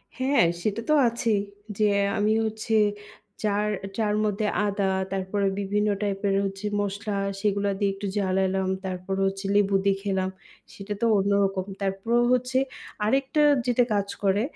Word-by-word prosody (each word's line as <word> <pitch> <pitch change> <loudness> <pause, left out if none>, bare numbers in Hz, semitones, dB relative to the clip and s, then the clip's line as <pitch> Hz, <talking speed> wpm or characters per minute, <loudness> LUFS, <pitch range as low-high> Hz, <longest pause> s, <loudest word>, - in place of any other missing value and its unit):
হ্যাঁ, 260 -5 +3 0.2
সেটাতো 230 +7 0
আছেই। 230 -2 +1 0.4
যে 215 - +1 0.3
আমি 210 +1 +2
হচ্ছে 220 +1 -3 0.7
চার 210 0 +1 0.3
চার 210 -2 +1
মধ্যে 210 0 -1 0.2
আদা, 200 0 -1 0.3
তারপরে 195 +1 -1
বিভিন্ন 205 +1 0
টাইপের 200 -1 0
হচ্ছে 195 +1 -5 0.2
মসলা, 205 +2 -3 0.3
সেগুলা 200 -1 +1
দিয়ে 200 -1 +2
একটু 200 +1 -5
জ্বালালাম। 190 -1 +1 0.2
তারপর 185 +1 -3
হচ্ছে 195 +1 -2
লেবু 200 -1 +3
দিয়ে 195 -1 +3
খেলাম, 190 -2 0 0.4
সেটাতো 205 +2 -4
অন্যরকম। 195 -1 +1 0.2
তারপরও 200 +5 +1
হচ্ছে, 250 +1 0 0.5
আরেকটা 270 +6 +1 0.2
যেটা 245 0 +3
কাজ 200 -1 0 0.2
করে, 200 +1 +3
200 Hz, 130 wpm, -25 LUFS, 195-215 Hz, 0.7 s, হ্যাঁ